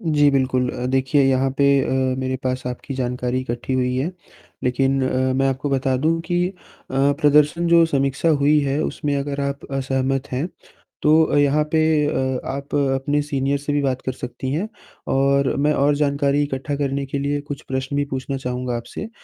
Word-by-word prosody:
जी, 150 -6 +3
बिल्कुल 130 -2 +1
अ, 125 0 -4
देखिए 135 +2 +2
यहाँ 135 0 +2
पे 140 - +4 0.2
अ, 130 -1 0
मेरे 130 0 -1
पास 130 0 -1
आपकी 125 +2 -5
जानकारी 125 0 -2
इकट्ठी 120 +1 -4
हुई 125 0 0
है, 145 +7 -1 0.5
लेकिन 135 +2 +1
अ, 130 0 +1
मैं 135 0 +2
आपको 140 +2 -2
बता 135 -1 +1
दूँ 160 +5 +1
कि 175 0 +1
अ, - - -10 0.4
प्रदर्शन 145 +4 +3
जो 170 -1 +6
समीक्षा 140 +1 0
हुई 150 0 +4
है 140 +1 0
उसमें 145 -2 -2
अगर 140 0 -3
आप 140 0 -3
असहमत 135 0 -1
हैं, 140 +8 -1 0.5
तो 155 0 +4
यहाँ 145 +1 +3
पे 160 - +3 0.3
अ, 130 -2 -1
आप 140 +2 -5
अपने 140 +1 +1
सीनियर 140 -1 -1
से 145 +1 -3
भी 145 - +1
बात 130 -2 -1
कर 130 - 0
सकती 130 +1 -6
हैं 180 +9 -1 0.4
और 140 0 +2
मैं 150 +1 +3
और 145 +1 +3
जानकारी 140 0 +1
इकट्ठा 140 +1 -3
करने 140 -1 -2
के 140 +1 -3
लिए 145 +1 -1
कुछ 145 -1 -7
प्रश्न 135 +1 -2
भी 145 - +1
पूछना 135 +1 -3
चाहूँगा 125 -1 -3
आपसे, 120 - -6
135 Hz, 185 wpm, -21 LUFS, 130-145 Hz, 0.5 s, जो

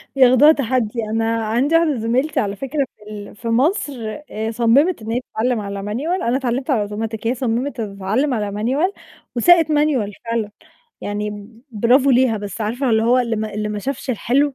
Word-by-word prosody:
ياخدوها 260 +3 +7
تحدي 245 -5 -1
أنا 225 0 0
عندي 250 +9 +1
واحدة 330 -3 +3
زميلتي 250 +7 0
على 200 -1 -1
فكرة 275 +4 -2
في 210 0 -13
ال 205 -1 -9
في 230 - -8
مصر 290 - +1 0.4
آآ، 220 +1 -3
صممت 245 +8 +3
إن 220 +1 -5
هي 240 - +1
تتعلم 235 +1 0
على 200 -1 -5
مانيوال 290 - -2
أنا 240 +2 +1
اتعلمت 260 +1 -2
على 245 -7 +2
أوتوماتيك 220 +2 -4
هي 250 - +1
صممت 245 +1 -2
تتعلم 210 +7 -1
على 210 -3 -2
مانيوال 260 - 0 0.4
وساقت 330 +5 +5
مانيوال 290 -9 +1
فعلًا، 230 -2 -2 0.5
يعني 205 0 -4 0.2
برافو 245 +5 +3
ليها، 250 -2 +3
بس 205 +2 -6
عارفة 245 +5 -1
اللي 220 0 +3
هو 245 +2 +4
اللي 235 -2 0
ما 215 -1 -4
اللي 210 0 -2
ما 210 0 -3
شافش 265 +4 -4
الحلو 270 +5 +1
235 Hz, 180 wpm, -20 LUFS, 215-270 Hz, 0.5 s, ياخدوها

